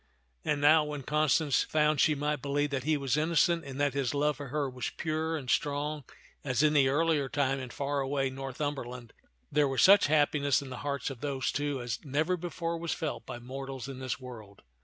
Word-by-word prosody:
And 150 - 0
now, 155 +2 +6
when 150 -2 -5
Constance 150 0 +2
found 150 -2 +2
she 155 - +4
might 150 0 -1
believe 145 +1 0
that 135 -2 -2
he 155 -1 +2
was 140 0 0
innocent 165 +2 +2
and 135 0 -7
that 145 -2 +2
his 140 -1 -1
love 150 0 +1
for 145 - -7
her 145 +2 -1
was 125 -2 -4
pure 160 +1 -1
and 135 -4 -8
strong 145 +1 -1 0.4
as 130 0 +1
in 155 0 +4
the 140 -3 +4
earlier 150 -1 +1
time 135 -1 0
in 130 -1 -6
far 140 +2 -2
away 135 0 -1
Northumberland, 130 -3 -5 0.4
there 150 0 +3
was 135 -1 +1
such 200 -2 +7
happiness 145 -2 +3
in 140 -2 -8
the - - -5
hearts 140 -1 -3
of 130 - -10
those 140 -3 -1
two 145 -1 -2
as 120 -2 -4
never 155 +5 0
before 170 -1 -4
was 170 -1 -2
felt 160 -3 -4
by 125 - -5
mortals 135 +1 -7
in 135 -2 -7
this 130 0 -3
world. 110 -6 -11
145 Hz, 205 wpm, -30 LUFS, 135-150 Hz, 0.4 s, such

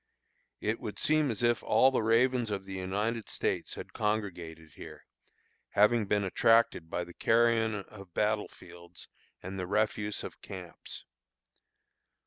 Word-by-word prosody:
It 110 +2 -1
would 105 -1 -6
seem 155 -2 +2
as 115 0 -2
if 120 -3 +3
all 130 - +4
the 130 - +1
ravens 120 +1 +3
of 100 -2 -3
the 95 - -7
United 105 +5 -2
States - - -2
had - - -9
congregated 90 -7 -3
here, - - -11 0.6
having 105 +1 +3
been 105 0 +2
attracted 100 -3 +3
by 90 - -2
the 85 0 -11
carrion 115 0 +3
of 100 -3 -14
battle 105 0 +1
fields 85 0 -12 0.4
and 95 +1 -5
the 90 - -3
refuse 105 +1 0
of - - -8
camps. 90 -3 -8
105 Hz, 140 wpm, -30 LUFS, 95-115 Hz, 0.6 s, all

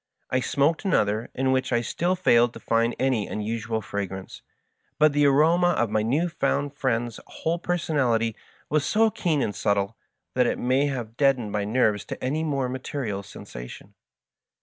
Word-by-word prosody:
I 130 - +2
smoked 145 +7 +1
another, 110 - +1
in 130 0 +1
which 130 0 0
I 120 -1 +2
still 175 +9 0
failed 120 -10 +4
to - - -9
find 115 +1 +1
any 130 -6 +1
unusual 110 +1 -3
fra 100 0 -3
grance; 95 0 -9 0.6
but 155 0 +4
the 145 0 +4
aroma 165 +5 +4
of 115 -3 +1
my 110 0 +2
new 140 +11 +1
found 145 -4 -1
friend's 120 -4 -1
whole 165 +2 -2
personality 135 -11 0 0.3
was 150 -1 +1
so 220 +4 +3
keen 160 -9 0
and 105 - -2
subtle, 100 +1 0 0.4
that 125 -1 +3
it - - 0
may 130 +3 +2
have 120 -4 -5
deadened 135 -7 +2
my 105 -1 -1
nerves 105 -2 +2
to - - -7
any 150 +5 0
more 140 -4 0
material 125 -5 -4
sensation. - - -10
130 Hz, 170 wpm, -25 LUFS, 110-145 Hz, 0.6 s, failed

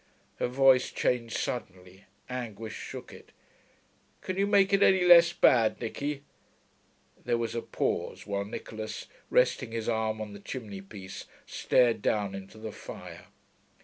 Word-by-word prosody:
Her - - 0
voice 130 0 +4
changed 115 -2 0
suddenly; 95 -6 -5 0.2
anguish 115 -4 -5
shook - - -8
it. - - -14 0.9
'Can 185 - -4
you 200 +1 +1
make 200 -1 +4
it 195 - +4
any 190 -2 +5
less 170 -1 +8
bad, 115 -9 +4
Nicky?' 140 +5 -4 1.0
There 120 -1 +1
was 115 -1 -2
a 115 - -2
pause, - - -2
while 100 0 -2
Nicholas, 110 +1 -6 0.2
resting 310 - +2
his 115 -1 -3
arm 110 -1 0
on 105 -1 -6
the 100 - -9
chimney 105 -3 -7
piece, 95 -1 -9 0.2
stared 120 -4 +2
down 100 -2 0
into 95 +2 -9
the 110 0 -6
fire. - - -10
115 Hz, 145 wpm, -29 LUFS, 105-135 Hz, 1.0 s, less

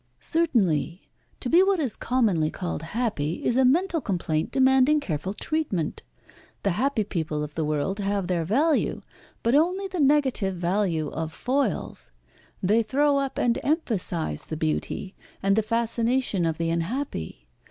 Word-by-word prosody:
"Certainly. 185 - 0 0.3
To - - -3
be 340 +8 +6
what 385 -1 +3
is 270 -8 -1
commonly 210 -11 +1
called 175 -2 -4
happy 170 -4 -2
is 240 - +2
a 265 - +4
mental 330 +6 +2
complaint 170 -8 -1
demanding 265 +2 +4
careful 185 - -3
treatment. 210 - -2 0.6
The 200 - +2
happy 225 +4 +1
people 155 -6 -3
of 150 0 -6
the 160 - -2
world 155 +6 -1
have 200 -1 -1
their 175 -2 0
value, 285 - +1 0.4
but 230 - +2
only 360 +7 +2
the 370 -2 -5
negative 270 -9 +2
value 175 -3 0
of 160 -1 -4
foils. 255 - -2 0.5
They 210 +5 +4
throw 280 +4 +2
up 275 -1 -3
and 240 +1 +1
emphasise 195 - -1
the 155 - -5
beauty, 160 +4 -2 0.3
and 195 0 +3
the 220 - +3
fascination 230 -3 0
of 160 -1 -2
the 165 0 -1
unhappy. 170 - -3
210 Hz, 150 wpm, -25 LUFS, 165-270 Hz, 0.6 s, be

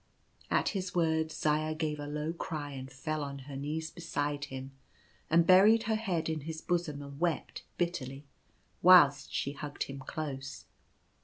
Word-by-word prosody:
At - - +2
his 190 -3 -4
words 160 -2 +1
Zaya 155 +1 +1
gave 155 -1 -2
a 145 - -5
low 150 +2 -2
cry 155 -4 -4
and 135 -1 -7
fell 155 +4 -3
on 140 -1 -5
her 140 -1 -8
knees 155 +3 -3
beside 145 -4 -2
him, 135 -1 -7 0.6
and 165 +1 +5
buried 200 +5 +7
her 220 0 +1
head 185 -7 -1
in 160 -1 -1
his 160 +2 -5
bosom 165 -5 -1
and 140 0 -10
wept 170 -4 -1 0.2
bitterly, 145 -6 -2 0.6
whilst 145 -6 +7
she 140 - -1
hugged 145 0 -4
him 135 0 -7
close. 135 - -5
155 Hz, 160 wpm, -31 LUFS, 140-170 Hz, 0.6 s, buried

